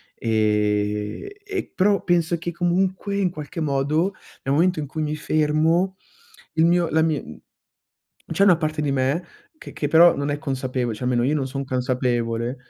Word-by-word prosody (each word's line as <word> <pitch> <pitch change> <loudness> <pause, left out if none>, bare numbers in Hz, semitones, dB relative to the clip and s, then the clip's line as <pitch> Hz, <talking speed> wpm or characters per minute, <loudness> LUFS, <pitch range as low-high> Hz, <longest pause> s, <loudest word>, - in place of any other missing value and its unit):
e 105 - -1
e 395 -2 -4
però 200 +1 +2
penso 170 -1 +1
che 170 +1 -4
comunque 185 +3 0
in 190 -3 +2
qualche 155 +1 -6
modo, 155 +6 0 0.3
nel 135 - 0
momento 175 +1 +2
in 145 - -4
cui 155 +3 -5
mi 150 0 -2
fermo, 155 +5 +1 0.6
il 160 +1 +4
mio 175 -1 +3
la 160 - +2
mi 150 - -2 0.9
c'è 195 +5 +3
una 180 -4 +6
parte 155 -2 -2
di 140 -2 0
me 135 +6 0 0.3
che - - -10
che 145 - -2
però 170 +1 +6
non 140 +1 -2
è 145 - -2
consapevole, 130 -5 -2
cioè 125 - -6
almeno 120 -1 +1
io 150 - +1
non 135 -2 -1
son 135 +1 -4
consapevole 125 -2 -1
150 Hz, 170 wpm, -23 LUFS, 130-175 Hz, 0.9 s, una